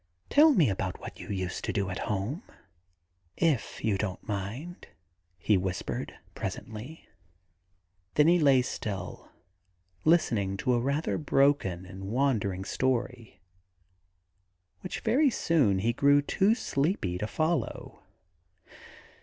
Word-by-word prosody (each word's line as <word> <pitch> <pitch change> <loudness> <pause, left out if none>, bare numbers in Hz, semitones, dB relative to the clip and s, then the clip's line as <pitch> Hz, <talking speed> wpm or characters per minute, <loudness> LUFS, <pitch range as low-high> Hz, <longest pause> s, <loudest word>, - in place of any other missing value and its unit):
*Tell 305 +2 +7
me 180 - +4
about 95 -2 -2
what - - -9
you - - -9
used 95 -3 -3
to - - -1
do 100 -2 -1
at 95 - -4
home, 105 - -2 1.0
if 155 -8 0
you 100 -3 +1
don't 95 -3 -4
mind,' 110 - -5 0.5
he 100 +4 +2
whispered 90 -1 -4 0.2
presently. 115 +9 -7 1.1
Then 150 +1 +5
he 175 +1 +5
lay 135 -5 +5
still, 105 -5 -5 0.7
listening 110 - +2
to 125 - +1
a 120 - +2
rather 140 +7 -1
broken 135 - +2
and 95 +1 -9
wandering 105 -5 0
story, 125 -1 -2 1.4
which 185 - -6
very 265 +6 +3
soon 150 - +2
he 115 +5 +1
grew 140 +3 +4
too 200 +8 +2
sleepy 140 - -1
to 105 - -2
follow. 155 - -2
120 Hz, 120 wpm, -29 LUFS, 100-155 Hz, 1.4 s, Tell